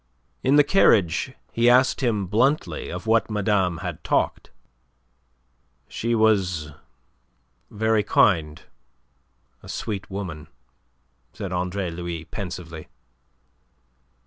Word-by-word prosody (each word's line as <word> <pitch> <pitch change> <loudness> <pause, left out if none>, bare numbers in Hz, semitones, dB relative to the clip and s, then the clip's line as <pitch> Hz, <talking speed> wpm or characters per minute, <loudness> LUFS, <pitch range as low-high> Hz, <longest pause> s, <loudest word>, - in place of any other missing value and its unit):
In 135 +2 +3
the 145 - +7
carriage 110 - +3 0.2
he 120 +1 +3
asked 130 +3 +4
him 110 -6 0
bluntly 125 - 0
of - - -6
what 115 +1 +2
madame 100 -4 +1
had 85 -3 -5
talked. - - 0 1.4
"She 115 +1 -2
was 95 -9 +1 1.0
very 110 0 +1
kind 80 -7 +2 1.0
a - - -13
sweet 100 -3 -5
woman," 90 -6 -6 0.9
said 100 -3 -6
Andre 90 0 -2
Louis 85 -1 -5
pensively. 85 -2 -7
100 Hz, 95 wpm, -24 LUFS, 85-110 Hz, 1.4 s, the